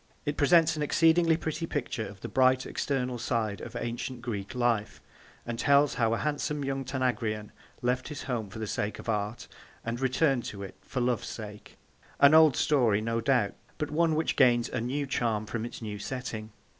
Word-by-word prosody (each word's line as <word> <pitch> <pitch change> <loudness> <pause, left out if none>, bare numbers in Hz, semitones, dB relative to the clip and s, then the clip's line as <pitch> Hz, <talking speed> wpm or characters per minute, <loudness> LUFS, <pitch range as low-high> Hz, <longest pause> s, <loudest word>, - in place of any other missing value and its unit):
It 145 0 -1
presents 160 +2 +4
an 150 - -4
exceedingly 165 +2 +4
pretty 160 0 -3
picture 120 -7 -3
of 95 -1 -12
the - - -5
bright 130 0 +3
external 125 -3 -2
side 115 -3 -1
of - - -8
ancient 120 +1 -4
Greek 105 -2 -4
life, 120 -4 0 0.5
and 120 -1 -4
tells 140 0 +4
how 115 -1 +1
a - - -2
handsome 150 0 -2
young 135 0 -2
Tanagrian 125 -5 -2 0.3
left 125 +1 0
his 150 - -6
home 120 -6 -3
for 100 - -9
the 110 - -3
sake 105 0 -2
of - - -10
art, 105 +1 -2 0.4
and 115 +1 -3
returned 130 0 +2
to 100 -1 -6
it 95 - -8
for 125 +5 -4
love's 120 -2 0
sake 105 -2 -9 0.4
an 140 +1 +7
old 155 -3 +7
story, 120 -9 +3
no 115 +1 -1
doubt, 120 -4 +2 0.2
but 150 -1 -3
one 160 +1 +2
which 160 +1 0
gains 120 -2 +4
a - - -2
new 135 +5 -1
charm 115 -5 -1
from 115 +1 -4
its 120 - -8
new 105 -2 -5
setting. 110 -2 -5
125 Hz, 190 wpm, -29 LUFS, 110-145 Hz, 0.5 s, an